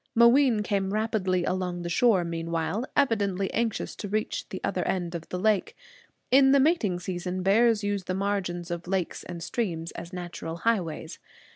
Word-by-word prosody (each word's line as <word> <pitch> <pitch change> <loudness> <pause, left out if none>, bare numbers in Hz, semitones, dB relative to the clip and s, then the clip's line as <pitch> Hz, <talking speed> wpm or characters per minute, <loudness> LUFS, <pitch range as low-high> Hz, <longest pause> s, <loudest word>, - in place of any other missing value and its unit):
Mooween 235 -1 +5
came 195 -1 -1
rapidly 195 -5 0
along 180 -1 -2
the - - -3
shore 195 0 +3
meanwhile, 165 +6 -2
evidently 200 -8 +1
anxious 225 -2 -1
to 205 - -5
reach 215 +1 -2
the - - -5
other - - -1
end 175 -2 -1
of 170 -1 -6
the 180 - -3
lake. 210 +1 +1 0.6
In 270 +1 +6
the 280 - +6
mating 265 - +2
season 180 0 -4
bears 220 +2 +4
use 205 -2 -1
the 185 - -2
margins 185 -3 -2
of 170 0 -4
lakes 185 -2 -1
and 170 -2 -7
streams 170 -7 -2
as 170 - -8
natural 175 -2 -6
highways. 170 -7 -1
190 Hz, 165 wpm, -27 LUFS, 175-220 Hz, 0.6 s, In